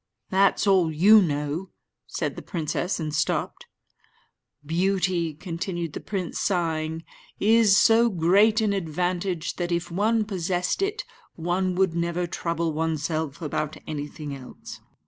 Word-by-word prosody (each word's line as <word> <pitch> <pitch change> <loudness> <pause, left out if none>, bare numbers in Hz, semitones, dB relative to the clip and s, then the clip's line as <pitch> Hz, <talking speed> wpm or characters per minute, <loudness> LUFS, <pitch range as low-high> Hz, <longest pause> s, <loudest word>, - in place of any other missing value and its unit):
"That's 195 +2 +3
all 185 -5 +4
you 205 +8 +6
know," 150 +2 -2 0.4
said - - -3
the - - -7
princess, 170 +3 -2
and 155 -2 -3
stopped. 150 - -1 1.0
"Beauty," 175 -1 0
continued 170 -1 -4
the - - -5
prince, 190 -4 -4
sighing, 160 -3 -1 0.4
"is 215 -1 +5
so 230 +1 +5
great 200 +5 +3
an 210 -2 +1
advantage 180 0 -2
that, 175 -1 -2
if 170 0 -2
one 215 +4 +1
possessed 180 - -1
it, 415 +5 -1 0.3
one 180 +2 -1
would 190 -2 +2
never 170 +1 -1
trouble 170 -1 -2
oneself 155 -1 -2
about 155 0 -3
anything 145 -1 -6
else. 130 -2 -11
175 Hz, 125 wpm, -25 LUFS, 160-195 Hz, 1.0 s, you